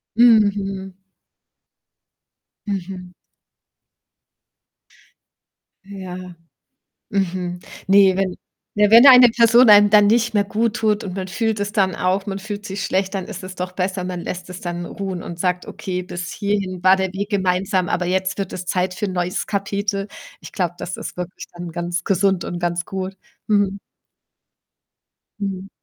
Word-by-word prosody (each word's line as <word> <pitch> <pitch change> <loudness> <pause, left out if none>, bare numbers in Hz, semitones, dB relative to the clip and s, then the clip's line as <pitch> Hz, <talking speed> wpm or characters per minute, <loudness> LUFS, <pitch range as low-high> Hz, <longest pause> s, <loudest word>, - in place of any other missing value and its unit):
Mhm. 200 -5 +3 1.7
Mhm. 185 -2 -5 2.7
Ja. 185 -2 -8 0.8
Mhm. 180 -3 -2 0.3
Ne, 195 -1 +6
wenn 190 -2 -1 0.4
ne, 210 0 +3
wenn 235 +5 +9
eine 250 -2 +9
Person 235 +1 +5
einem 205 -1 +8
dann 210 -1 +6
nicht 230 +2 +2
mehr 205 - +3
guttut 215 0 0
und 185 - -5
man 185 -1 -4
fühlt 220 +1 -1
es 205 0 -2
dann 190 -3 +1
auch, 190 +2 0
man 195 -1 -3
fühlt 205 +1 -7
sich 195 0 -4
schlecht, 190 +1 -1
dann 190 -2 -3
ist 200 -4 -8
es 185 0 -8
doch 180 0 -4
besser, 185 0 -2
man 180 -1 -4
lässt 180 +1 -6
es 180 0 -8
dann 175 0 -5
ruhen 190 -2 -5
und 170 0 -8
sagt: 180 0 -1
„Okay, 180 -1 -4
bis 175 -1 -6
hierhin 200 -3 -2
war 190 +1 +6
der 190 -1 -2
Weg 200 +1 -4
gemeinsam, 185 -1 0
aber 180 0 -1
jetzt 190 +2 -1
wird 195 -2 -3
es 180 - -5
Zeit 185 0 -1
für 210 - -2
‘n 190 - -4
neues 180 0 -2
Kapitel.“ 200 0 -2 0.3
Ich - - -11
glaube, 175 -2 -1
das 180 - -5
ist - - -7
wirklich 180 0 -7
dann 175 -1 -7
ganz 175 +1 -3
gesund 190 -1 +1
und 175 - -4
ganz 175 0 -1
gut, 190 0 -5 0.3
mhm. 200 -2 +2 1.6
Mhm. 195 -1 -4
190 Hz, 155 wpm, -20 LUFS, 180-205 Hz, 2.7 s, wenn